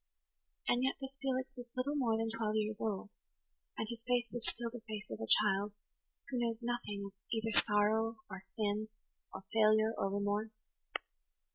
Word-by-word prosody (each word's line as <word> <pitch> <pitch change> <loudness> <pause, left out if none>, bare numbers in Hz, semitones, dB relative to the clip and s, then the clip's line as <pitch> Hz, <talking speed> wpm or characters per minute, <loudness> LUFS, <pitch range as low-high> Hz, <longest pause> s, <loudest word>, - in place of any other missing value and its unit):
And 245 +1 +3
yet 265 - +3
this 270 0 -6
Felix 260 -1 -1
was 245 -1 -7
little 265 +3 +1
more 235 -6 +3
than 225 0 0
twelve 215 -2 0
years 215 0 0
old, 205 -2 -1 0.7
and 220 - -1
his 230 0 -6
face 245 -1 +1
was 240 -1 -2
still 235 -1 -2
the 240 -1 -7
face 215 -1 -4
of 110 - -4
a 110 - -3
child 205 - +4 0.5
who 260 -3 -1
knows 230 0 0
nothing 235 -4 -2
of 200 - -6 0.2
either 225 -1 0
sorrow 220 +1 +4
or 190 -2 -6
sin 210 +2 -1 0.4
or - - -7
failure 215 0 +5
or 195 - +1
remorse. 205 +2 0
220 Hz, 170 wpm, -36 LUFS, 210-240 Hz, 0.7 s, failure